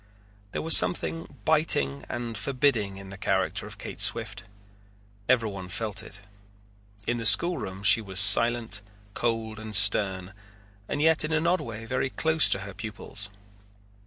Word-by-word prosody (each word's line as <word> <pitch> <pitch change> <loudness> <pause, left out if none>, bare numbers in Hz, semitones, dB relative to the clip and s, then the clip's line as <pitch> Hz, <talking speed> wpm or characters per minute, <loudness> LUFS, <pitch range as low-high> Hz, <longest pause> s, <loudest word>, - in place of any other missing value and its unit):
There - - -4
was 160 0 +7
something 165 -1 +3
biting 70 - +1
and 120 -1 -5
forbidding 115 -3 -1
in 95 -1 -11
the 100 - -11
character - - -1
of - - -12
Kate - - -9
Swift. - - 0 0.8
Everyone 105 -7 0
felt 105 +1 -3
it. 100 +1 -12 0.8
In 120 - -1
the 115 - -5
schoolroom 100 - +1
she 100 +3 +4
was 95 -3 -1
silent, 115 +1 +4 0.3
cold, 115 -1 -3
and 110 -1 -6
stern, 95 -1 +2 0.6
and 145 - -2
yet 160 0 +3
in 155 - -4
an 160 +1 0
odd 180 +2 +1
way 115 -1 -8
very 130 +2 -2
close 160 +3 +1
to 95 - -1
her 100 0 -8
pupils. 105 0 -5
110 Hz, 150 wpm, -26 LUFS, 100-130 Hz, 0.8 s, was